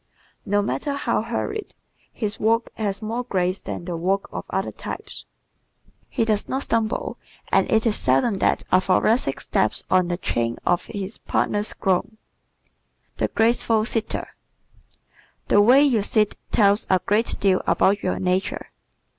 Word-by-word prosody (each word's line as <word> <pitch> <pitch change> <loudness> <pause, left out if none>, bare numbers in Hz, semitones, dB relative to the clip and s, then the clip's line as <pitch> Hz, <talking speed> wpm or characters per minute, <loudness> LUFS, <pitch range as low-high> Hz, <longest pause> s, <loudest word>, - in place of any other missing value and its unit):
No 205 +1 +2
matter 285 +7 -2
how 245 -6 0
hurried, 415 - -4 0.4
his 210 -3 -4
walk 225 +2 +1
has 205 -1 -3
more 230 +3 -2
grace 185 -5 -1
than 175 - -6
the 175 -1 -4
walk 190 +4 -1
of - - -6
other - - -2
types. - - -8 0.8
He 230 - 0
does 215 -2 0
not 270 +1 -1
stumble; 225 -1 -1 0.3
and - - +2
it 220 +1 +3
is 220 -2 +2
seldom 135 - +2
that - - +2
a 185 - +5
Thoracic 190 - +2
steps 110 - 0
on 185 -1 +4
the 175 0 -2
train 115 -8 -1
of 175 - +1
his 200 0 -6
partner's 205 +1 0
gown. 195 +3 -1 1.0
The - - +1
Graceful 225 -1 +2
Sitter 225 -2 -1 0.6
¶ - - -25 0.5
The 205 - +6
way 255 +7 +6
you 250 -7 +3
sit 210 +1 +2 0.2
tells 205 0 +3
a 185 - +4
great 215 +3 +2
deal 190 -2 +2
about 200 +2 +3
your 185 - -1
nature. 185 +1 -1
205 Hz, 155 wpm, -23 LUFS, 185-230 Hz, 1.0 s, The